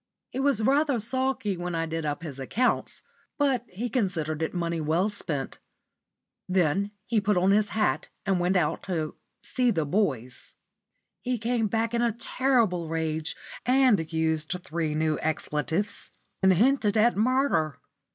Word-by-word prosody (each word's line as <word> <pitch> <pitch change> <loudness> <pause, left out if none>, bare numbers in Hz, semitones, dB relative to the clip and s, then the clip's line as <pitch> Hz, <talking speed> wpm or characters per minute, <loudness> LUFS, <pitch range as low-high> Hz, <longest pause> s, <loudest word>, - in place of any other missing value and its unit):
He 260 - -4
was 270 -5 +2
rather 275 +1 +3
sulky 260 -3 -1
when 175 0 -4
I 165 0 0
did 165 -1 -3
up 145 +2 -3
his 140 -5 -7
accounts, 230 - 0 0.3
but 270 -5 +2
he 215 +7 -4
considered 170 - -1
it 160 - 0
money 170 -2 -2
well 165 +7 +1
spent. 145 -9 -4 0.9
Then 185 +2 +2 0.2
he 225 -3 +1
put 205 -1 +2
on 185 +2 +4
his 210 +1 +4
hat 215 - +1 0.2
and 195 -2 +2
went 180 +2 +1
out 165 -5 +1
"to 160 -5 -2 0.3
see 250 -1 +1
the 165 -9 +1
boys." 140 - -1 0.7
He 250 0 -1
came 230 0 0
back 225 +2 -1
in 235 - +1
a 235 -2 +2
terrible 230 -8 +1
rage, 160 -1 -2 0.3
and 245 -10 +3
used 160 +1 0
three 160 -3 -2
new 155 0 +1
expletives, 160 +5 -1 0.3
and 190 0 +5
hinted 220 +1 +3
at 235 +3 +4
murder. 225 - +1
190 Hz, 150 wpm, -27 LUFS, 160-235 Hz, 0.9 s, and